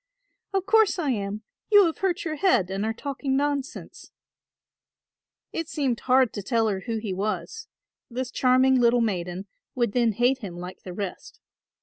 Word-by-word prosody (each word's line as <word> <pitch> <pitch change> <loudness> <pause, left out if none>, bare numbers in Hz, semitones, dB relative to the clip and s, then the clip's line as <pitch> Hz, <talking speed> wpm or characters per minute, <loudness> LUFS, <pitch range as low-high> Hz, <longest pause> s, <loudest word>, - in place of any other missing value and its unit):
"Of 385 -1 -1
course 435 -1 +4
I 305 -6 0
am; 205 -1 -3 0.3
you 410 -2 +8
have 330 - -2
hurt 380 -1 -1
your 315 - -2
head 285 - +2
and 195 +1 -2
are 220 - 0
talking 270 +2 -2
nonsense." 285 +1 -3 1.4
It 330 -1 -3
seemed 270 -6 -1
hard 255 -2 +3
to 205 - -4
tell 225 +3 +1
her 195 -2 -1
who 230 -1 -1
he 215 -3 -3
was; 215 - -3 0.4
this 250 +1 -4
charming 255 0 +4
little 240 0 +4
maiden 185 -3 -2 0.3
would 240 -4 +1
then 235 -1 +2
hate 245 +5 +2
him 190 -7 -7
like 180 +1 -8
the 180 - -8
rest. 195 -1 -6
245 Hz, 165 wpm, -25 LUFS, 205-285 Hz, 1.4 s, you